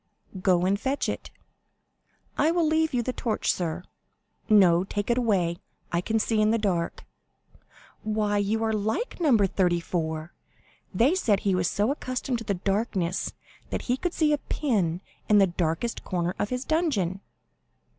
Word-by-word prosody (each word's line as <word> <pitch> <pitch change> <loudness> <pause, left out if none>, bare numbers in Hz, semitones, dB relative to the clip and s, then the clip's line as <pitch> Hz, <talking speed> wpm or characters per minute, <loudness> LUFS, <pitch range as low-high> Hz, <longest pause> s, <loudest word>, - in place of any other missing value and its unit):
"Go 180 -2 +3
and 200 +2 +1
fetch 270 +4 -1
it." - - -4 1.1
"I 305 - +3
will 335 0 +2
leave 315 0 +2
you 245 -2 0
the 255 - -2
torch, 230 -3 0
sir." 175 0 -3 0.7
"No, 185 -5 +6
take 205 +3 -2
it 235 - +1
away; 185 -8 +1 0.3
I 170 - +1
can 220 +4 0
see 220 0 +1
in 215 - +3
the 225 - +3
dark." 185 -6 -2 1.0
"Why, 210 -1 0
you 215 +3 0
are 220 0 +1
like 220 - -2
No. 285 -8 +5
34. 175 -4 0 0.6
They 235 - +3
said 220 - +1
he 195 - +1
was 180 -1 +1
so 210 +5 +1
accustomed 255 -4 -3
to - - +1
darkness 195 -2 -1 0.4
that - - -3
he 250 - +1
could 350 +6 -3
see 305 -2 +3
a 295 - +1
pin 190 - -1 0.3
in 210 - +6
the 195 - +7
darkest 175 +5 -2
corner 175 -1 -1
of 205 - -1
his 250 +1 -3
dungeon." 215 - 0
210 Hz, 160 wpm, -26 LUFS, 180-245 Hz, 1.1 s, the